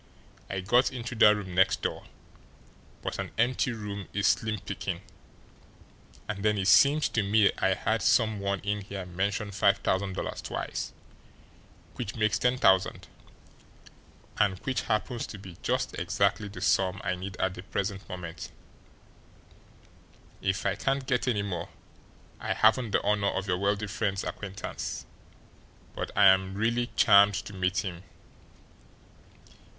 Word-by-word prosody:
I 95 -1 -2
got 120 +7 +3
into 125 -2 -5
that 105 -2 +6
room 95 -3 -6
next 95 +1 +3
door, - - -3 1.0
but - - -4
an - - -3
empty 125 +3 +1
room 105 -3 -6
is 100 -1 0
slim 110 +1 +2
picking. - - -5 1.3
And 105 -2 -4
then 105 -1 +2
it 95 -1 +1
seemed 145 - +6
to 110 - +2
me 105 +1 +4
I 95 0 +2
heard 110 +2 -1
some 110 -1 +3
one 100 -1 -1
in 105 0 -2
here 100 -1 -6
mention 100 +4 -2
five 100 +1 +3
thousand 95 0 -1
dollars - - -4
twice, - - -4 1.1
which 110 -5 -4
makes 110 -2 +1
ten 125 +1 +2
thousand, 95 -5 +2 1.3
and 95 -3 +3
which 130 -2 0
happens 115 +2 -2
to 105 - -8
be 95 -3 -11
just - - -1
exactly 105 - +1
the 100 - -9
sum 95 +1 +2
I 90 - 0
need 95 +1 -6
at 95 -1 0
the 90 - -8
present 95 0 -4
moment 85 -2 -7 1.9
if 95 +1 -1
I 100 - +2
can't 135 +6 -1
get 130 -1 0
any 105 -5 +1
more! 90 -4 -4 0.7
I - - -1
haven't 125 -3 +3
the - - +1
honour 105 -1 +2
of 95 - -2
your 90 -1 0
wealthy 100 +2 0
friend's 100 -1 -2
acquaintance, 100 -1 -5 0.9
but - - -3
I 100 - +7
am 95 0 +5
really 115 +3 0
charmed 100 -1 +6
to 100 +1 -5
meet 95 +1 0
him. 85 -2 -5
100 Hz, 145 wpm, -28 LUFS, 95-110 Hz, 1.9 s, I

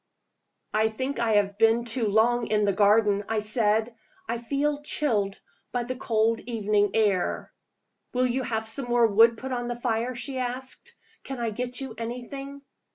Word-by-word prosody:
"I 220 0 +3
think 260 +5 -3
I 230 -2 +1
have 200 0 +1
been 225 +1 +4
too 230 -1 0
long 230 +3 +2
in 210 -1 +2
the 200 - +2
garden," 205 0 +3
I 225 - 0
said. 215 +1 +1 0.3
"I 235 - -2
feel 285 +4 -1
chilled 220 -10 0 0.3
by 245 -1 -1
the 255 +2 -4
cold 225 -2 +1
evening 210 -3 0
air." 205 -5 0 0.6
"Will 255 0 +1
you 255 +1 0
have 220 -3 -2
some 235 +4 -3
more 240 -1 +3
wood 225 +2 +5
put 265 +3 -6
on 245 -1 -2
the 240 0 -4
fire?" 240 +1 -1
she 260 +2 -4
asked. 255 +1 -4 0.3
"Can 270 -2 -6
I 230 -2 -1
get 245 +3 -3
you 265 -4 -5
anything?" 275 +4 -6
230 Hz, 170 wpm, -26 LUFS, 215-250 Hz, 0.6 s, wood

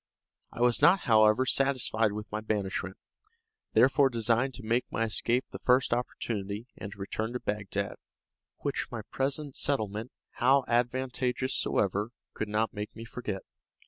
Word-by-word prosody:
I - - -7
was 120 -1 +4
not, 190 +2 +6
however, 110 +1 +5
satisfied 130 -5 +2
with 105 +1 -5
my 105 0 -2
banishment; 100 -3 -2 0.8
therefore 135 +2 +5
designed 120 +2 +1
to 130 - -9
make 115 +3 0
my 115 - 0
escape 120 +3 +1
the - - -7
first 125 -1 +3
opportunity, 110 -3 -3
and 100 - -7
to - - -11
return 110 +4 -3
to 125 - -2
Bagdad, 100 -2 -3 0.6
which - - -2
my 115 -3 -5
present 140 +1 -2
settlement, 110 -3 -1 0.3
how 130 +2 +5
advantageous 125 +1 0
soever, 100 +2 0 0.2
could 110 - -3
not 110 +2 0
make 105 0 -6
me 115 +1 -8
forget. 110 -5 -5
115 Hz, 145 wpm, -29 LUFS, 105-130 Hz, 0.8 s, not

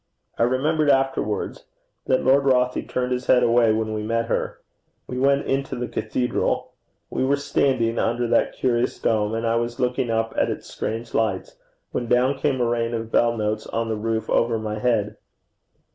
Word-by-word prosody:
I - - +4
remembered 145 +5 +1
afterwards 135 -6 0 0.4
that 130 - +2
Lord 135 +2 +4
Rothie 125 -1 +1
turned 125 0 -1
his 125 0 -2
head 125 - +5
away 115 -1 +4
when 110 0 -1
we 110 - -2
met 115 +2 -1
her. - - -2 0.5
We 125 - -5
went 140 +1 +2
into 135 0 -1
the 125 0 -3
cathedral. 125 -1 -1 0.4
We - - -1
were 135 +2 +3
standing 130 -5 +1
under 120 +1 0
that - - +2
curious 125 -1 0
dome, 110 0 0
and 115 +1 -2
I 115 0 +2
was 120 0 -3
looking 125 -1 0
up 115 0 0
at - - +1
its - - -5
strange 115 +1 -5
lights, 105 -4 -1 0.4
when 120 - -3
down 125 +3 +2
came 140 -3 0
a - - +3
rain 115 0 0
of 115 0 -5
bell 120 0 +3
notes 110 0 -2
on 115 0 -2
the 110 - 0
roof 110 +1 -2
over 115 -1 +2
my 110 -1 -4
head. 105 -3 0
120 Hz, 185 wpm, -23 LUFS, 115-130 Hz, 0.5 s, head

